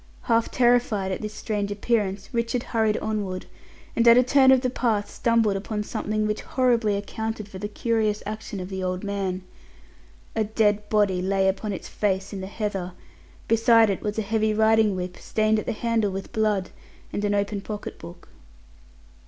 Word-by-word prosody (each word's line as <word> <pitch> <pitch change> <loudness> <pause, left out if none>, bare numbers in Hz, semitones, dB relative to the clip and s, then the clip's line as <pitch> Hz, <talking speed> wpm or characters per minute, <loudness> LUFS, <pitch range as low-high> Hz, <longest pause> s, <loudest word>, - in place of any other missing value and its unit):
Half 230 -2 +2
terrified 240 -6 +2
at 185 - -3
this 215 0 -5
strange 205 -2 -2
appearance, 205 -2 -1
Richard 235 +1 -1
hurried 220 -2 +1
onward, 200 -4 -3 0.5
and 235 0 +3
at 235 +1 +9
a 250 - +6
turn 265 +1 +5
of 260 -1 +5
the 255 - 0
path 220 -5 0
stumbled 230 -3 +2
upon 210 +2 -3
something 215 0 -2
which 210 0 -1
horribly 235 -5 +1
accounted 220 +1 -4
for 190 -2 -9
the 205 - -3
curious 215 -1 0
action 215 -1 -5
of 180 0 -6
the 190 -1 -4
old 185 0 -2
man. 195 -2 -2 0.9
A 220 - +2
dead 210 -1 +1
body 205 -4 +2
lay 190 +1 +1
upon 205 +2 -1
its 190 - -6
face 195 -1 -1
in 195 - -5
the 190 - -5
heather; 195 -3 -3 0.5
beside 225 -1 +5
it 190 - -3
was 210 0 -3
a 220 - 0
heavy 215 +1 +1
riding 220 -1 +4
whip 180 0 -5
stained 215 0 +1
at - - -7
the - - +1
handle 225 -1 0
with 195 0 -6
blood, 210 -4 0 0.4
and 205 - -2
an 205 0 +1
open 200 0 -1
pocket 210 0 -7
book. 175 +1 -12
210 Hz, 180 wpm, -25 LUFS, 195-225 Hz, 0.9 s, at